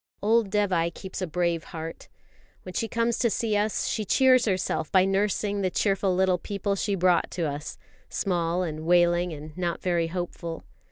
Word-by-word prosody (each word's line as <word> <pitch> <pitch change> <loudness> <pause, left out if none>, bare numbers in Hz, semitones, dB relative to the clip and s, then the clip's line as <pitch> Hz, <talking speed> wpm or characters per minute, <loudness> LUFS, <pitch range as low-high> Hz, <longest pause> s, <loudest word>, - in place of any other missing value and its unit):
Old 220 0 +3
Dévai 185 -5 +1
keeps 190 +1 -7
a 185 - -1
brave 170 0 -1
heart. 165 0 -8 0.5
When 185 - -8
she 225 - -1
comes 230 +1 0
to 235 - +3
see 220 0 0
us, 210 +1 0
she 220 - -1
cheers 255 +3 +4
herself 185 -6 -1
by 185 -1 +5
nursing 200 +1 0
the 185 - +1
cheerful 195 0 +1
little 185 -1 +2
people 200 +1 -2
she 200 +1 -1
brought 180 -1 +2
to 175 - -3
us, 145 -1 -4 0.3
small 175 -2 0
and 155 -3 -4
wailing 175 +1 +3
and 155 0 -9
not 175 -2 -2
very 175 -2 +1
hopeful. 170 -1 -5
185 Hz, 175 wpm, -26 LUFS, 170-205 Hz, 0.5 s, by